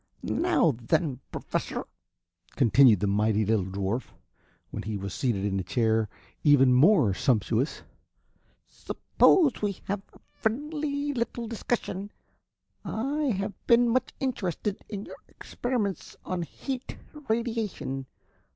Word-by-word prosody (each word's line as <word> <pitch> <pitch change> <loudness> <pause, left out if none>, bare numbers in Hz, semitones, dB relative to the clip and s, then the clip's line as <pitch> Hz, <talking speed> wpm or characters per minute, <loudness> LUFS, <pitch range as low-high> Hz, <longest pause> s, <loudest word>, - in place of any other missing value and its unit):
"Now 335 - +2
then, 130 +2 0
Professor," - - -3 0.7
continued 125 -5 +6
the - - +2
mighty 105 +1 +2
little 110 -2 +2
dwarf, 100 +5 -2 0.6
when - - -4
he 105 +1 -3
was 100 -1 -5
seated 110 -7 0
in 100 -1 0
a - - -2
chair 110 +2 +1 0.3
even 135 -4 +6
more 140 - +5
sumptuous, 120 - 0 0.8
"suppose 315 -9 +2
we 205 -1 0
have 200 0 -2
a - - -19
friendly 290 +4 -2
little 235 -1 -2
discussion. 210 -3 -3 0.7
I 280 +7 -1
have 200 -5 -1
been 240 0 +5
much 255 +2 +1
interested 205 - -2
in 205 -2 -5
your - - -10
experiments 235 -6 -3
on 185 -1 -2
heat 260 - -5 0.3
radiation. 220 - -2
185 Hz, 115 wpm, -27 LUFS, -, 0.8 s, continued